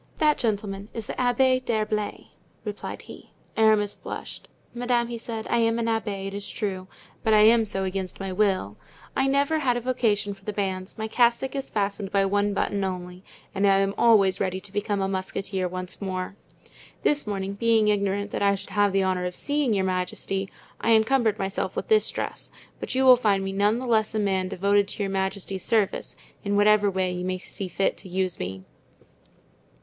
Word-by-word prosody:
"That 300 Hz, -1 st, +3 dB
gentleman 205 Hz, -2 st, -2 dB
is 225 Hz, -2 st, -4 dB
the -, -, -5 dB
Abbé 255 Hz, +1 st, +2 dB
d'Herblay," 215 Hz, -3 st, -2 dB, 0.4 s
replied 210 Hz, -1 st, -6 dB
he. -, -, -13 dB, 0.2 s
Aramis 215 Hz, -2 st, +3 dB
blushed. -, -, -8 dB, 0.3 s
"Madame," 240 Hz, -1 st, 0 dB
he 235 Hz, -, -4 dB
said, 225 Hz, -1 st, -5 dB
"I 235 Hz, -, +1 dB
am 230 Hz, 0 st, +2 dB
an 230 Hz, -, -1 dB
abbé, 215 Hz, -4 st, -1 dB
it 195 Hz, -, -5 dB
is 200 Hz, 0 st, -6 dB
true, 190 Hz, -4 st, -3 dB, 0.4 s
but 220 Hz, -2 st, +4 dB
I 210 Hz, -, +6 dB
am 225 Hz, +1 st, +6 dB
so 195 Hz, -2 st, -1 dB
against 190 Hz, -1 st, -4 dB
my 195 Hz, -1 st, -4 dB
will. 185 Hz, -, 0 dB, 0.4 s
I 265 Hz, -, +2 dB
never 280 Hz, +3 st, +2 dB
had 250 Hz, -5 st, +1 dB
a -, -, -3 dB
vocation 225 Hz, -5 st, 0 dB
for 195 Hz, -, -18 dB
the 210 Hz, -, -4 dB
bands; 190 Hz, -2 st, -3 dB
my 220 Hz, 0 st, -3 dB
cassock 240 Hz, +4 st, +2 dB
is 275 Hz, -1 st, -3 dB
fastened 200 Hz, -1 st, -2 dB
by 195 Hz, -1 st, +3 dB
one 205 Hz, +1 st, +1 dB
button 200 Hz, 0 st, 0 dB
only, 180 Hz, -1 st, -5 dB, 0.3 s
and 200 Hz, +1 st, +2 dB
I 195 Hz, 0 st, +5 dB
am 195 Hz, 0 st, +1 dB
always 200 Hz, -5 st, +4 dB
ready 185 Hz, -1 st, -1 dB
to 205 Hz, -, -11 dB
become 205 Hz, 0 st, -1 dB
a 190 Hz, -, +1 dB
musketeer 190 Hz, 0 st, -2 dB
once 185 Hz, +1 st, -5 dB
more. 185 Hz, -1 st, -3 dB, 0.7 s
This 290 Hz, -5 st, +2 dB
morning, 195 Hz, -1 st, -2 dB
being 220 Hz, 0 st, +3 dB
ignorant 200 Hz, 0 st, 0 dB
that -, -, -3 dB
I 200 Hz, 0 st, +4 dB
should 195 Hz, -, -10 dB
have 205 Hz, -1 st, +2 dB
the 195 Hz, 0 st, +3 dB
honor 185 Hz, -1 st, 0 dB
of 180 Hz, -, -6 dB
seeing 290 Hz, -3 st, 0 dB
your 195 Hz, -3 st, +1 dB
majesty, 190 Hz, +1 st, -2 dB, 0.3 s
I 230 Hz, -, +3 dB
encumbered 220 Hz, -1 st, +3 dB
myself 195 Hz, -2 st, -3 dB
with -, -, -4 dB
this 435 Hz, -1 st, +4 dB
dress, -, -, -5 dB, 0.3 s
but -, -, -5 dB
you 265 Hz, 0 st, +3 dB
will 255 Hz, -1 st, +9 dB
find 205 Hz, -5 st, +2 dB
me 195 Hz, -, -2 dB
none 205 Hz, +3 st, +2 dB
the 255 Hz, -, -4 dB
less 220 Hz, -2 st, +1 dB
a -, -, +1 dB
man 190 Hz, -2 st, +1 dB
devoted 200 Hz, +2 st, +2 dB
to 205 Hz, -, -4 dB
your 195 Hz, -, -2 dB
majesty's 190 Hz, 0 st, -2 dB
service, 215 Hz, -4 st, 0 dB, 0.3 s
in 200 Hz, 0 st, 0 dB
whatever 205 Hz, 0 st, +5 dB
way 185 Hz, -1 st, 0 dB
you 180 Hz, 0 st, -4 dB
may 185 Hz, 0 st, -1 dB
see 190 Hz, +1 st, -7 dB
fit 195 Hz, +2 st, 0 dB
to 190 Hz, -, -11 dB
use 185 Hz, 0 st, -1 dB
me." 95 Hz, +1 st, -5 dB
205 Hz, 200 wpm, -25 LUFS, 190-225 Hz, 0.7 s, will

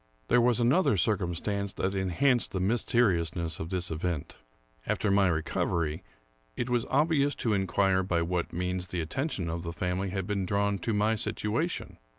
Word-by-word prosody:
There 125 Hz, -, +5 dB
was 120 Hz, 0 st, +3 dB
another 120 Hz, -, +3 dB
circumstance 100 Hz, +1 st, -1 dB
that 95 Hz, +1 st, -1 dB
enhanced 105 Hz, +7 st, +1 dB
the 95 Hz, -, -1 dB
mys 110 Hz, +6 st, +1 dB
teriousness 85 Hz, -8 st, +1 dB
of 80 Hz, -, -4 dB
this 90 Hz, -2 st, -2 dB
event. 80 Hz, -1 st, -3 dB, 0.5 s
After 105 Hz, -, +1 dB
my 100 Hz, -1 st, +4 dB
recovery, 80 Hz, 0 st, -1 dB, 0.5 s
it 125 Hz, -, -2 dB
was 120 Hz, -1 st, +1 dB
ob 150 Hz, +5 st, +2 dB
vious 145 Hz, -2 st, +2 dB
to 115 Hz, -, 0 dB
inquire 95 Hz, 0 st, +2 dB
by 85 Hz, -3 st, 0 dB
what 85 Hz, 0 st, -2 dB
means 90 Hz, +1 st, -2 dB
the 90 Hz, -1 st, -3 dB
attention 100 Hz, -, -2 dB
of 85 Hz, +1 st, -3 dB
the 85 Hz, 0 st, -5 dB
family 90 Hz, +3 st, -2 dB
had 95 Hz, 0 st, -3 dB
been 100 Hz, -1 st, -1 dB
drawn 100 Hz, 0 st, +1 dB
to 110 Hz, +4 st, -1 dB
my 105 Hz, +2 st, +2 dB
situation. 110 Hz, -, -2 dB
95 Hz, 170 wpm, -29 LUFS, 85-110 Hz, 0.5 s, There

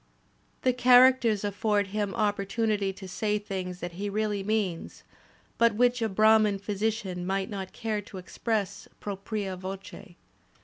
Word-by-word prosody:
The 255 Hz, -, +3 dB
charac 250 Hz, +1 st, +7 dB
ters 215 Hz, -4 st, +1 dB
afford 205 Hz, 0 st, +1 dB
him 205 Hz, -1 st, -2 dB
opportunity 205 Hz, -1 st, 0 dB
to 190 Hz, 0 st, -10 dB
say 210 Hz, +3 st, -1 dB
things 185 Hz, -3 st, -5 dB
that 175 Hz, -, -4 dB
he 200 Hz, +4 st, -4 dB
really 210 Hz, 0 st, -1 dB
means 195 Hz, -4 st, -2 dB, 0.6 s
but 230 Hz, -2 st, +4 dB
which 245 Hz, +1 st, +2 dB
a 225 Hz, -, +1 dB
Brahman 215 Hz, 0 st, +4 dB
physician 200 Hz, -2 st, -2 dB
might 190 Hz, +2 st, -2 dB
not 190 Hz, -2 st, -5 dB
care 220 Hz, -3 st, -3 dB
to 200 Hz, -1 st, -11 dB
express 205 Hz, +2 st, -3 dB
propria 200 Hz, -1 st, -4 dB
voce. 190 Hz, 0 st, -8 dB
205 Hz, 140 wpm, -28 LUFS, 195-220 Hz, 0.6 s, charac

